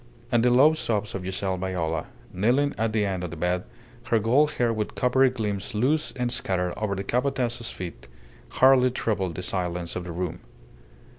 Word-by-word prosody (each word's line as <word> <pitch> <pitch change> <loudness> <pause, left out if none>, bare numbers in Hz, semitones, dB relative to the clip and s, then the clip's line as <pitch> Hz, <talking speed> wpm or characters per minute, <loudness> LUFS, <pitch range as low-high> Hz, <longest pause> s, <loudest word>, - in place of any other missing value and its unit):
And 120 - +4
the 125 - +5
low 135 +6 +6
sobs 110 -9 -1
of 95 - -4
Giselle 95 0 -2
Viola, 85 -4 -2 0.3
kneeling 125 +9 +2
at 110 0 0
the 105 -1 +1
end 95 -2 -2
of 90 - -3
the 85 - -8
bed, 90 +2 -1 0.4
her 115 - +2
gold 130 +8 +3
hair 120 -2 +1
with 110 -1 -3
coppery 130 +1 +3
gleams 105 -6 -4
loose 140 +8 +1
and 125 -2 -2
scattered 90 -5 0
over 105 -2 -2
the 95 - -3
Capataz's 125 0 -1
feet, 85 -9 -8 0.4
hardly 130 -1 +5
troubled 100 -8 -2
the 90 - -5
silence 90 -2 -3
of 90 - -3
the 90 - -6
room. 90 0 -4
105 Hz, 180 wpm, -26 LUFS, 90-125 Hz, 0.4 s, low